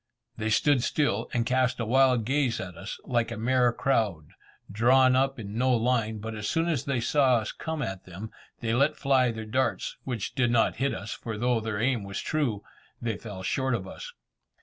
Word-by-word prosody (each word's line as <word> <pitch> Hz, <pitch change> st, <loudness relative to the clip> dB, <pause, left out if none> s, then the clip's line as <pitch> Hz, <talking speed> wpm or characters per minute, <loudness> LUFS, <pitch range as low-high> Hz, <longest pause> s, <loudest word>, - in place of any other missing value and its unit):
They 110 Hz, 0 st, -2 dB
stood 140 Hz, +4 st, +3 dB
still, 120 Hz, -5 st, 0 dB
and 120 Hz, -1 st, 0 dB
cast 125 Hz, 0 st, +1 dB
a 115 Hz, -, -1 dB
wild 130 Hz, -1 st, +3 dB
gaze 130 Hz, -2 st, +1 dB
at 90 Hz, -1 st, -6 dB
us, 95 Hz, +5 st, -7 dB
like 120 Hz, -3 st, 0 dB
a 115 Hz, -, -5 dB
mere 125 Hz, +2 st, +3 dB
crowd, 105 Hz, -, 0 dB, 0.4 s
drawn 125 Hz, +4 st, +4 dB
up 135 Hz, +1 st, +1 dB
in 105 Hz, -2 st, -7 dB
no 130 Hz, 0 st, +3 dB
line; 115 Hz, -2 st, +1 dB
but 110 Hz, +1 st, -6 dB
as 105 Hz, -1 st, -3 dB
soon 165 Hz, +1 st, +1 dB
as 155 Hz, -8 st, -1 dB
they 140 Hz, -3 st, 0 dB
saw 130 Hz, +1 st, +3 dB
us 110 Hz, -2 st, -1 dB
come 160 Hz, -2 st, -4 dB
at 95 Hz, -5 st, -5 dB
them, 95 Hz, +5 st, -8 dB, 0.3 s
they 115 Hz, -1 st, 0 dB
let 140 Hz, +5 st, +3 dB
fly 130 Hz, -3 st, +3 dB
their 110 Hz, -1 st, -5 dB
darts, 120 Hz, +2 st, -1 dB
which 120 Hz, -6 st, -4 dB
did 130 Hz, -4 st, +2 dB
not 120 Hz, -1 st, +2 dB
hit 140 Hz, +3 st, 0 dB
us, 105 Hz, +2 st, -5 dB
for 110 Hz, -2 st, -6 dB
though 120 Hz, +1 st, +1 dB
their 110 Hz, -2 st, -3 dB
aim 120 Hz, -2 st, +1 dB
was 100 Hz, 0 st, -5 dB
true, 125 Hz, -10 st, -1 dB, 0.4 s
they 115 Hz, -2 st, -2 dB
fell 100 Hz, -4 st, -8 dB
short 130 Hz, +5 st, 0 dB
of 95 Hz, -4 st, -5 dB
us. -, -, -8 dB
120 Hz, 205 wpm, -27 LUFS, 110-130 Hz, 0.4 s, drawn